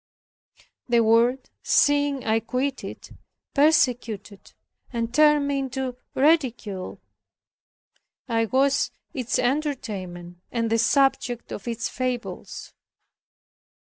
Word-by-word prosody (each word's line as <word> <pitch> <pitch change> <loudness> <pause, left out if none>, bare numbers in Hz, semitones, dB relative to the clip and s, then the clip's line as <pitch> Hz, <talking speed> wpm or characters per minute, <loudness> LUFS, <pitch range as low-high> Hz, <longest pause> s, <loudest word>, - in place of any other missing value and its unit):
The 235 -1 +4
world, 235 +3 +2
seeing 285 -2 +2
I 220 0 +2
quit 255 +4 -2
it, - - -9 0.4
persecuted 240 -9 +1 0.4
and 235 -1 -3
turned 300 0 +5
me 280 -1 0
into 265 -1 -3 0.2
ridicule. 250 - +1 1.3
I 225 -2 +1
was 270 +4 +2 0.2
its 250 -4 -1
entertainment, 210 - -3
and 230 -2 -1
the 230 - +3
subject 250 -1 +1
of 205 - -7
its 230 -1 -2
fables. 250 -1 -5
245 Hz, 95 wpm, -24 LUFS, 225-275 Hz, 1.3 s, turned